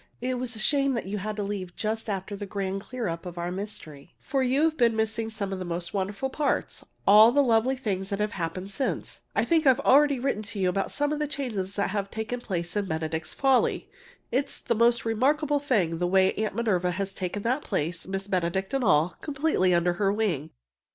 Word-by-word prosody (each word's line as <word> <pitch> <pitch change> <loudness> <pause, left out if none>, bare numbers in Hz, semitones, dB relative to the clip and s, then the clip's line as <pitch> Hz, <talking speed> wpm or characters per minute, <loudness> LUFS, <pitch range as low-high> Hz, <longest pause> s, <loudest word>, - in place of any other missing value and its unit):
It 250 +1 -2
was 250 -1 -2
a - - -6
shame 275 +3 +3
that 230 - -3
you 200 +2 -3
had 215 +2 -4
to 205 - -2
leave 195 -3 -4
just 220 +1 -2
after 195 0 -3
the 200 0 -6
grand 195 0 -3
clear 240 +1 -4
up 165 -1 -4
of 175 -1 -8
our 175 +1 -3
mystery, 180 -7 -7
for 270 - -1
you've 285 +5 +2
been 235 -5 +3
missing 220 0 -1
some 205 -3 -4
of 190 - -4
the - - -3
most 175 0 -4
wonderful 200 +6 -2
parts 290 +1 -1 0.2
all 215 +3 +8
the 285 +3 +4
lovely 240 +1 +3
things 195 -7 -3
that 200 - -1
have 210 0 -1
happened 185 +2 -4
since. 270 - -3
I - - +2
think 325 -3 +2
I've 260 0 +5
already 285 +1 +5
written 245 -4 -1 0.2
you 185 - +2
about 195 +2 -1
some 290 +1 0
of 300 - -3
the 300 - 0
changes 230 -10 -3
that 200 -1 -1
have 200 -1 -2
taken 220 +3 -4
place 175 -5 -3
in 205 -1 0
"Benedict's 160 0 -3
Folly." 270 -2 +2 0.4
It's 275 +3 0
the - - -1
most 235 +1 +3
remarkable 290 +6 +2
thing 195 - 0
the 175 - +1
way 190 +1 +4
Aunt 215 -2 -2
Minerva 195 -6 +1
has 195 +1 -3
taken 190 +2 -4
that 255 +5 +1
place 170 -3 -2
Miss 195 +1 -3
Benedict 190 +2 -1
and 270 -1 +1
all 165 -3 +3
completely 280 -10 +1
under 175 0 +3
her 195 -1 +3
wing! 190 -9 -1
210 Hz, 215 wpm, -27 LUFS, 185-255 Hz, 0.4 s, all